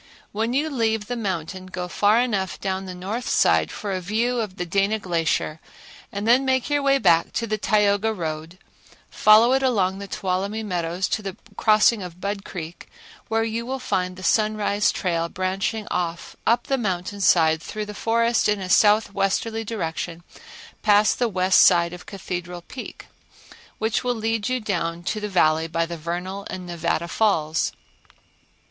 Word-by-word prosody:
When 225 +3 -1
you 290 +4 +1
leave 225 -4 0
the 245 - -4
mountain 185 -4 -4
go 180 -1 -5
far 205 +5 +3
enough 200 -7 -1
down 190 -1 -3
the 185 - -6
north 205 +7 -4
side 80 -1 +3
for 205 - -5
a 185 -1 -2
view 230 +6 0
of 210 -5 -3
the 180 - -3
Dana 195 +5 +1
Glacier, 165 -5 -1 0.5
then 230 +6 +3
make 260 +1 0
your 290 0 +2
way 275 0 +3
back 165 -10 +3
to 230 - -1
the 215 -1 -2
Tioga 210 +1 +2
road, 165 -3 -5 0.5
follow 220 +4 +6
it 270 - +2
along 195 -7 +1
the 200 - -7
Tuolumne 200 +4 -2
Meadows 175 0 -1
to - - -1
the 195 -1 -6 0.2
crossing 215 0 +4
of 180 -1 -8
Budd 200 +1 -3
Creek 170 -3 -8 0.4
where 225 0 +1
you 225 +1 -2
will 260 +3 -3
find 185 -7 -2
the 185 - -10
Sunrise 215 +1 +2
trail 170 -3 -1
branching 190 +4 -2
off 170 -1 -3
up 235 +2 +3
the 270 -1 0
mountain 200 -1 -3
side 160 -4 +4
through 215 +5 -5
the 210 - -8
forest 230 +2 +1
in 210 -1 +1
a 185 -1 -5
southwesterly 210 +2 +2
direction 170 -5 -4 0.6
past 210 0 +4
the 240 -2 +2
west 185 -1 +4
side 170 0 +5
of 180 - -11
Cathedral 175 -2 -6
Peak, 255 - -9 0.7
which 220 0 -1
will 245 -1 0
lead 225 0 -1
you 255 0 0
down 170 -6 -2
to 215 +4 -2
the 210 0 -4
Valley 160 -3 +2
by 165 +1 0
the 170 +1 -6
Vernal 180 +5 -5
and 185 -1 -6
Nevada 170 0 -2
Falls. 165 -6 +1
200 Hz, 170 wpm, -23 LUFS, 175-220 Hz, 0.7 s, follow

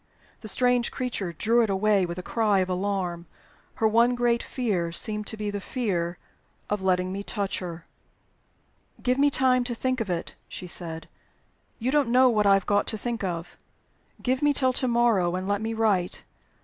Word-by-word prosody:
The 215 - -9
strange 245 +2 +2
creature 235 -8 -3
drew 230 +8 +2
it 225 - +1
away 195 -1 +2
with 170 +1 -5
a 180 - -5
cry 215 -2 +1
of 185 - -2
alarm: 180 -3 -2 0.5
her 220 - +2
one 235 +3 +3
great 240 -1 +2
fear 195 -10 -2
seemed 210 +4 -1
to 220 - -4
be 210 -1 -3
the 205 0 -4
fear 180 -8 -2 0.5
of 210 -1 0
letting 185 -1 +1
me 195 +1 -4
touch 200 -1 -2
her. 170 -2 -7 1.2
"Give 250 +1 +1
me 285 +1 +5
time 255 -2 +3
to 240 -1 -2
think 255 +1 -1
of 215 - -3
it," 175 -1 -3 0.2
she - - -7
said. 165 -2 -5 0.7
"You 245 +3 -1
don't 290 -4 +2
know 255 +1 +5
what 210 -3 +2
I 195 - +7
have 195 - 0
got 205 0 +1
to 220 - 0
think 235 0 -4
of. 175 -2 -4 0.6
Give 255 +1 0
me 295 0 +3
till 260 -2 +2
to 255 - 0
morrow; 230 -7 +2
and 185 +1 -3
let 205 0 0
me 225 +1 -2
write. 205 -5 0
210 Hz, 190 wpm, -26 LUFS, 185-240 Hz, 1.2 s, I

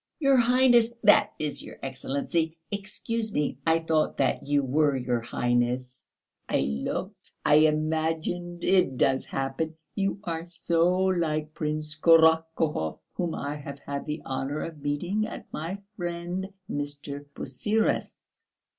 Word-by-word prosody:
"Your 275 -3 +4
Highness, 245 -1 +5
that 205 -1 +6
is, 150 -1 -2
your - - -10
Excellency.... 140 +5 -2
Excuse 215 +2 -2
me, 145 -6 -1
I 160 0 +5
thought 160 -1 0
that 135 - +1
you 145 0 +1
were 145 +2 +2
your 125 -2 0
Highness. 120 +2 -1 0.4
I - - +2
looked... 70 0 -3
I 150 - +6
imagined... 160 +3 -1
it 180 -9 +3
does 135 0 +2
happen. 135 +4 -3 0.2
You 195 0 -1
are 165 -2 -4
so 170 0 +2
like 155 -4 0
Prince 155 0 -3
Korotkouhov 160 - +4 0.2
whom 175 -3 -2
I 145 +1 -3
have 140 -1 -8
had 140 0 -5
the 150 +1 -4
honour 135 +3 -2
of 160 -3 -7
meeting 175 +9 -1
at - - -8
my 165 +6 -3 0.2
friend 175 +1 -3 0.2
Mr. 145 0 -4
Pusyrev's.... 210 - -2
155 Hz, 130 wpm, -27 LUFS, 140-175 Hz, 0.4 s, that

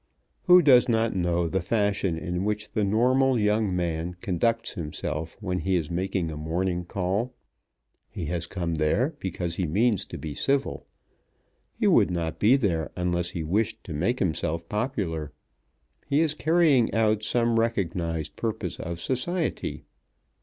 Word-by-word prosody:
Who 180 -1 +7
does 130 -3 +6
not 115 -1 +1
know 85 -1 +1
the 95 +3 -1
fashion 100 -3 0
in 90 +2 -3
which 105 +1 -2
the 105 - 0
normal 125 +5 +3
young 105 -2 +1
man 85 0 -2
conducts 115 +6 0
himself 80 0 -4
when 90 -3 -2
he 95 0 0
is 85 -2 -1
making 90 -1 -1
a - - -5
morning 90 +4 -2
call? 100 +8 -2 0.7
He 85 - -5
has 85 +1 -3
come 85 -3 -3
there 90 - +1
because 90 -2 -3
he 90 - 0
means 105 +5 +2
to - - -7
be 75 -2 -6
civil. 135 - -1 0.9
He - - +1
would - - +5
not 85 -2 -3
be 115 +6 +5
there 90 - 0
unless 90 -1 -1
he 85 -2 -4
wished 100 +7 -1
to 85 - -7
make 95 +12 0
himself 85 -3 -1
popular. 95 - -2 0.8
He 145 +2 +3
is 160 -2 +2
carrying 155 -6 +3
out 110 -1 +2
some 115 +1 +2
recognized 85 -8 -1
purpose 115 -2 -3
of 85 0 -5
society. 160 - -2
95 Hz, 155 wpm, -26 LUFS, 85-115 Hz, 0.9 s, Who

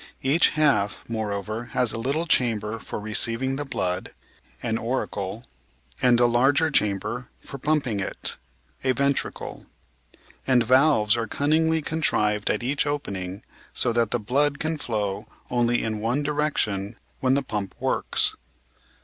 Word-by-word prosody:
Each 140 +6 +4
half, 120 -10 +2
moreover, 110 0 -3
has 125 -3 +3
a 115 - -4
little 140 +8 -1
chamber 115 -7 +1
for - - -5
receiving 115 +5 +1
the 145 +1 -3
blood 90 -8 -2 0.5
(an 115 -2 -1
auricle) 115 -3 -3 0.6
and 125 -2 +4
a 120 - +5
larger 135 +7 +3
chamber 110 +2 0
for 140 - -9
pumping 140 -8 +1
it 95 - -2 0.5
(a 130 -1 +2
ventricle), 140 +2 -2 0.8
and 125 -3 +4
valves 130 -3 +4
are 115 -1 -2
cunningly 160 +5 +1
contrived 105 -10 +1
at 105 - 0
each 140 +4 0
opening 100 -10 -4 0.3
so 120 - +3
that 115 -2 +2
the 120 - 0
blood 140 +6 +1
can 160 +1 -2
flow 105 -4 -2 0.2
only 120 -1 +2
in 110 -1 -2
one 120 +7 0
direction 120 -9 -1 0.2
when 130 0 +2
the 140 - +1
pump 105 -6 -4
works. - - +1
120 Hz, 140 wpm, -25 LUFS, 105-140 Hz, 0.8 s, a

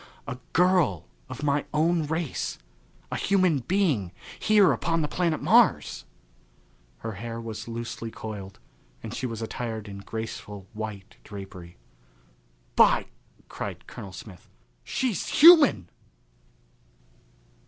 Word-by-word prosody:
A 125 - -6
girl 180 - +3 0.2
of - - -7
my 145 0 +1
own 160 0 +2
race: 160 -2 -2 0.5
a - - -1
human 185 -6 +2
being 145 - 0 0.3
here 210 -3 +5
upon 165 -1 0
the - - 0
planet 170 0 -1
Mars! - - +3 1.0
Her 115 - -4
hair 115 +3 -6
was 110 -1 -6
loosely 115 0 -5
coiled 100 -4 -8 0.5
and - - -6
she 130 - -3
was 115 -1 -5
attired 110 -2 -4
in 100 -1 -8
graceful 105 -2 -6
white 105 -3 -7
drapery. 95 -4 -10 1.0
"By - - +5 0.2
!" - - -31
cried - - -6
Colonel 95 - -9
Smith, 95 -1 -12 0.3
"she's 245 -9 -1
human!" 295 - +7
115 Hz, 115 wpm, -26 LUFS, 105-165 Hz, 1.0 s, human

